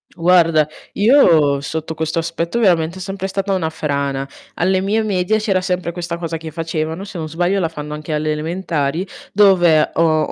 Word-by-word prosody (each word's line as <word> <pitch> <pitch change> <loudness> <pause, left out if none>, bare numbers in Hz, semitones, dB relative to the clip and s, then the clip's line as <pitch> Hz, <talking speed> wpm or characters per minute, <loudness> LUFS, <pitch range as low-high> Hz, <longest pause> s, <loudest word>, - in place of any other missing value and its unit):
Guarda, 165 -3 +4 0.3
io 170 - +4
sotto 160 +2 -4
questo 160 +1 -1
aspetto 165 +6 -2
veramente 175 -5 +2
è - - -8
sempre 195 0 -4
stata 195 0 -2
una 165 -4 0
frana. 140 -3 -2 0.3
Alle 185 +2 +1
mie 215 +3 0
medie 205 +1 0
c'era 195 -3 0
sempre 180 -2 -2
questa 170 0 -5
cosa 165 -1 -4
che 160 0 -8
facevano, 160 +2 -3
se 195 -3 -8
non 155 -1 -4
sbaglio 175 +5 0
la 165 -3 0
fanno 150 -2 -7
anche 150 +1 -5
alle 155 0 0
elementari, 160 0 -2 0.2
dove 180 -6 +4
o 155 -2 +2
165 Hz, 175 wpm, -18 LUFS, 155-190 Hz, 0.3 s, Guarda